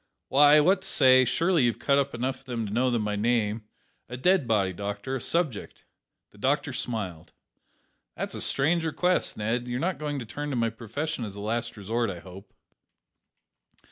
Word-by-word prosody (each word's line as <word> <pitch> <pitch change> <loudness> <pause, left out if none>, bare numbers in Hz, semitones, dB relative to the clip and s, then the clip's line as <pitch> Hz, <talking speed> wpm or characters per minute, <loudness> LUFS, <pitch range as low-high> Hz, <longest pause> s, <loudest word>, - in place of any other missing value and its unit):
"Why, 145 +2 +7
what 180 +6 +4
I 190 - -9
say; 130 0 +5
surely 165 -1 +2
you've 115 -3 0
cut 140 +3 +2
up 140 -2 -1
enough 130 +2 -3
of 135 - -20
'em 115 -2 -2
to 100 - -5
know 125 +2 +2
'em 115 -3 0
by 105 0 -1
name; 110 0 0 0.4
a 125 - -6
dead 180 0 +2
body, 100 -4 +1
doctor, 100 +7 -4
a 130 - -4
subject." 160 - -2 0.5
The - - -19
doctor - - 0
smiled. 95 -9 -5 0.8
"That's - - -4
a - - -4
strange 160 +5 +1
request, 180 +3 0
Ned. 115 +3 -2
You're 125 0 -2
not 180 +4 -1
going 150 -1 -3
to 125 - -5
turn 145 +6 -5
to 140 - -2
my 115 -2 +1
profession 125 +6 -4
as 100 -3 -6
a - - -8
last 115 +2 -3
resort, 115 +3 -1
I 90 - -5
hope?" 95 +3 -12
120 Hz, 190 wpm, -27 LUFS, 105-145 Hz, 0.8 s, Why